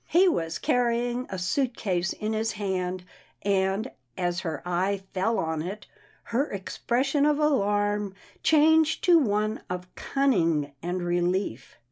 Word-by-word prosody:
He 360 +4 +5
was 165 - 0
carrying 245 0 0
a 190 - -4
suit 235 +8 0
case 185 -3 0
in 215 +1 -3
his 220 +1 -1
hand, 185 -3 -2 0.4
and, 195 +4 +1 0.3
as 175 -1 0
her 160 -5 -4
eye 185 +3 0
fell 220 +5 +1
on 160 -1 -1
it, 195 +6 -6 0.4
her 260 +6 -1
expression 255 +8 0
of 295 0 +3
alarm 205 -8 +1 0.3
changed 315 0 +4
to 345 -2 +6
one 215 -4 0
of 180 0 -5
cunning 170 - +1
and 175 +1 -2
relief. 175 - -1
205 Hz, 135 wpm, -27 LUFS, 180-245 Hz, 0.4 s, to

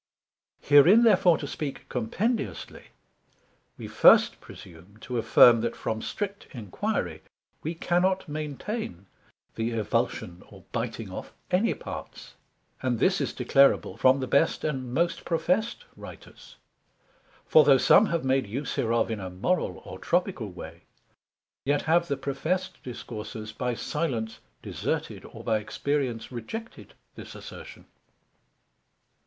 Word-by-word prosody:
Herein 165 +11 +7
therefore 185 -7 +5
to - - -6
speak 140 0 -6
compendiously, 125 - -3 0.9
we - - -7
first - - +5
presume 90 +5 -14
to 125 -2 -3
affirm 115 0 +6
that 120 - -2
from 110 0 -3
strict 200 - -5
enquiry, 105 -8 -3 0.4
we 160 +2 -4
cannot 185 +3 +1
maintain 150 - -5 0.5
the 115 0 -2
evulsion 110 -5 -2
or - - -15
biting - - -4
off - - -8 0.2
any 190 +6 +2
parts, - - -9 0.5
and 125 -2 0
this 185 - +2
is - - -1
declarable 135 +2 +3
from 130 +1 +4
the - - -1
best 140 +5 +1
and 130 -5 -3
most 170 +6 0
professed 185 - -1
Writers: - - -13 0.9
for 155 - +6
though 140 -2 +6
some 210 +10 +5
have 170 -5 -2
made 130 -3 +1
use 130 +7 -4
hereof 115 0 0
in 110 - -3
a 95 -1 -5
Moral 95 - -2
or - - -9
Tropical 175 - -1
way, 85 -2 -10 0.8
yet 145 +1 +1
have 170 +2 +2
the 140 -3 -1
professed 160 +8 -3
Discoursers 110 -3 -7
by 125 -1 -2
silence 115 -8 -3 0.2
deserted, - - -4
or - - -11
by 110 -1 +1
experience 125 +1 -2
rejected 220 - -8 0.2
this - - -11
assertion. - - -11
135 Hz, 125 wpm, -27 LUFS, 115-170 Hz, 0.9 s, Herein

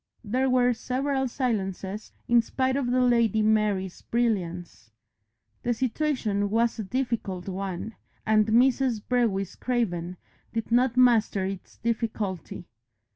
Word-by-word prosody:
There 255 +5 0
were 250 -1 +3
several 265 +3 -1
silences 210 -5 -3 0.2
in 240 0 +5
spite 260 +3 -1
of 270 -3 0
the 255 +1 +2
Lady 235 -3 +3
Mary's 210 -4 +1
brilliance. 180 - -2 0.7
The 240 0 0
situation 230 -5 0
was 230 +2 +1
a - - -1
difficult 220 -5 -3
one, 195 +2 -4 0.3
and 215 -1 +3
Mrs. 245 +1 +3
Brewis 220 -7 0
Craven 180 -8 -2 0.4
did 225 0 -3
not 245 +1 +3
master 225 -6 +4
its 195 -1 -7
difficulty. 215 -7 -3
225 Hz, 120 wpm, -26 LUFS, 195-250 Hz, 0.7 s, in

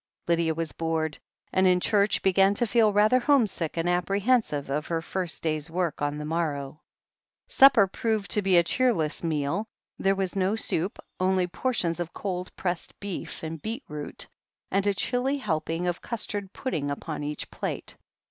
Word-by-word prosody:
Lydia 165 -1 +2
was 165 -1 -2
bored, 160 -2 -2 0.3
and 190 0 +4
in 180 0 +4
church 205 +2 +2
began 195 +1 +4
to 240 - +3
feel 220 -1 +4
rather 215 +5 +4
homesick 230 - +1
and 165 +1 0
apprehensive 185 - +1
of 150 +2 -1
her 165 -1 0
first 175 +1 -3
day's 155 -1 -1
work 170 -2 -2
on 145 0 -1
the 150 - -5
morrow. 150 -3 -2 0.7
Supper 265 -7 +7
proved 205 -1 -2
to 210 - +4
be 190 -2 +4
a 170 - +6
cheerless 175 -8 +1
meal. 165 +6 -1 0.3
There 195 0 +2
was 190 -1 -2
no 195 +2 +1
soup, 190 -3 -1 0.2
only 185 0 +2
portions 180 -3 -1
of 175 0 -4
cold' 180 -2 -3
pressed 175 -2 -4
beef 200 -4 -5
and 160 -1 -5
beetroot, 215 - -5 0.5
and 195 +1 +1
a 200 - +3
chilly 255 +7 +1
helping 165 - -2
of 175 -1 -1
custard 205 -4 -4
pudding 155 - -3
upon 150 +2 -4
each 150 +1 -4
plate. - - -4
180 Hz, 165 wpm, -27 LUFS, 160-205 Hz, 0.7 s, Supper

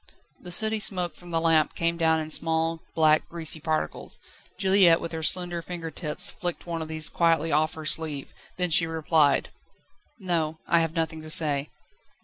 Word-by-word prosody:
The 180 - -10
sooty 220 +4 +1
smoke 180 -4 -2
from 175 - -14
the 165 -1 0
lamp 165 -2 +2
came 170 0 0
down 160 -1 +2
in 155 0 -7
small, 165 +1 +2
black, 155 -1 +3
greasy 160 -2 -2
particles; 155 0 -3 0.4
Juliette 190 -3 +5
with 170 - -6
her 160 -1 -5
slender 175 +2 -1
finger 165 -1 -7
tips 150 -1 0
flicked 175 -1 -4
one 170 -1 -4
of 160 - -5
these 160 0 -2
quietly 165 -1 +1
off 155 +2 +1
her 160 -1 -8
sleeve, 155 -3 -1 0.2
then 180 -1 -1
she 165 +1 +4
replied: 160 -2 +1 0.7
"No; 165 -6 -2
I 170 - +3
have 165 0 -2
nothing 160 -1 -2
to 155 - -10
say." 150 -2 +4
165 Hz, 175 wpm, -26 LUFS, 155-170 Hz, 0.7 s, Juliette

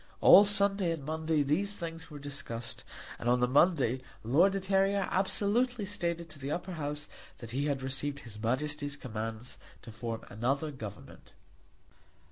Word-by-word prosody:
All 205 - +9
Sunday 200 -2 +3
and 150 -4 -7
Monday 160 0 0
these 195 +9 0
things 165 -1 -6
were 150 - -8
discussed; 140 -5 -5 0.4
and 120 - -1
on 125 0 +4
the 125 - +3
Monday 135 -3 +3 0.2
Lord 165 - +4
de 195 - 0
Terrier 195 +1 +2
absolutely 210 +4 +1
stated 170 -4 -3
to 150 - -11
the 135 +1 -5
Upper 180 +5 -3
House 150 -2 -4 0.3
that 115 -3 -9
he 135 +4 -1
had 140 -3 -1
received 140 +2 -2
her 120 - -11
Majesty's 145 +4 -1
commands 115 -2 -6 0.2
to 115 - -9
form 115 0 -5
another 135 +8 -1
government. 110 -7 -10
145 Hz, 155 wpm, -31 LUFS, 125-185 Hz, 0.4 s, All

